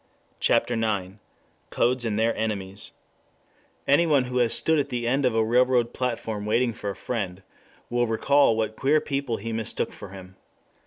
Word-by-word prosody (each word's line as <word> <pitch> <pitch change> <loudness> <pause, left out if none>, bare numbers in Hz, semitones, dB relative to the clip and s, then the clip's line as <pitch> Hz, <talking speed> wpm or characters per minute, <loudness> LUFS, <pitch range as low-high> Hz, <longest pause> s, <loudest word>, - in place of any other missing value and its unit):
CHAPTER - - +2
IX 105 -4 -2 0.5
CODES 125 0 +1
AND 105 -2 -1
THEIR 115 +1 +2
ENEMIES 100 -2 -4 0.9
ANYONE 145 -2 +4
who 125 0 -4
has 120 -2 +2
stood 160 -1 +3
at 140 - -1
the 120 -1 -2
end 135 +3 +1
of 115 - -1
a 110 -1 +2
railroad 120 0 +2
platform 115 -4 -3
waiting 115 +3 +1
for 105 -2 -5
a 100 - -4
friend, 95 -6 -4 0.4
will 120 0 0
recall 115 +1 +3
what 110 -1 -1
queer 145 +6 +2
people 140 -5 -2
he 115 +2 -5
mistook 110 -1 -2
for - - -10
him. 95 -1 -12
115 Hz, 165 wpm, -25 LUFS, 110-125 Hz, 0.9 s, ANYONE